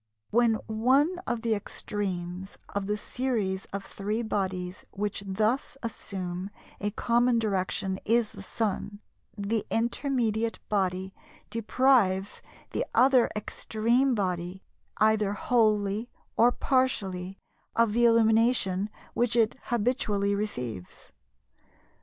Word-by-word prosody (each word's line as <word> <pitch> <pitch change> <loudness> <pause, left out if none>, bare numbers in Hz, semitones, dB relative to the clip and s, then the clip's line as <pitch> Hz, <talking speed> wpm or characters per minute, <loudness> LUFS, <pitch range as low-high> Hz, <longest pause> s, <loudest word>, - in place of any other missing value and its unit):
"When 230 0 +4
one 265 +11 +2
of 235 -1 -2
the 230 -1 +2
extremes 190 -3 -4
of 200 -1 -3
the 210 0 0
series 210 -6 -2
of 200 0 -6
three 210 +4 -3
bodies 185 -4 -2
which 205 0 -3
thus 220 +8 0
assume 190 -4 -4 0.3
a 205 - 0
common 235 +3 +2
direction 190 -2 -1
is 230 0 +2
the - - -11
Sun, 205 -1 -3 0.4
the 205 +2 -1
intermediate 230 -2 0
body 190 -2 0 0.4
deprives 225 -4 +2 0.3
the - - 0
other 255 -2 +5
extreme 235 +5 +1
body, 180 -2 -2 0.3
either 215 -2 +3
wholly 215 0 +1 0.3
or 240 +2 +5
partially, 195 -9 0 0.4
of 230 -2 +3
the 240 +1 +4
illumination 225 -3 +3 0.2
which 240 -1 +1
it 225 -1 +4
habitually 215 -4 +1
receives. 125 - -5
215 Hz, 105 wpm, -28 LUFS, 195-235 Hz, 0.4 s, other